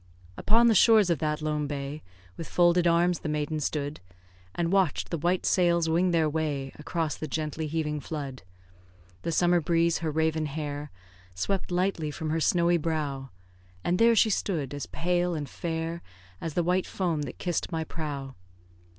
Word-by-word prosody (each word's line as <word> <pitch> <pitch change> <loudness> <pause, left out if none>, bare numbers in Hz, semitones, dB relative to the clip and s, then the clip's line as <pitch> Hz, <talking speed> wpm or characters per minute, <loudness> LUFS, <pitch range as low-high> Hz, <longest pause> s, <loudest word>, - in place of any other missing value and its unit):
Upon 230 - +4
the 235 - +6
shores 215 -2 +6
of 165 - +1
that 150 +1 -1
lone 150 -1 -1
bay, 140 +1 -5 0.3
With 165 - -7
folded 175 0 +4
arms 170 +1 +3
the 155 - -4
maiden 150 +1 -1
stood; 145 0 -2 0.6
And 170 0 0
watch'd 190 -5 +1
the 170 - 0
white 175 +4 +1
sails 170 -3 +3
wing 170 +3 +2
their 165 -2 +3
way 145 -3 -2
Across 160 0 -2
the 155 - -5
gently 155 +1 -3
heaving 150 -1 -2
flood. 140 -4 -6 0.8
The - - -2
summer 175 +1 +3
breeze 170 +1 +2
her 165 - -2
raven 160 0 0
hair 145 0 -4 0.5
Swept 190 - -2
lightly 180 -3 0
from 155 +1 -4
her 165 - +1
snowy 170 +1 +3
brow; 150 -4 -2 0.5
And 180 +1 +1
there 230 0 +6
she 220 0 +4
stood, 155 -9 -1
as 145 - -5
pale 175 0 0
and 150 -2 -4
fair 165 +3 -4 0.4
As 160 -3 -4
the 175 - +2
white 180 +2 +1
foam 170 -5 -1
that 145 - -6
kiss'd 175 -3 -2
my 160 -1 -1
prow. 145 -4 -5
160 Hz, 170 wpm, -28 LUFS, 150-175 Hz, 0.8 s, the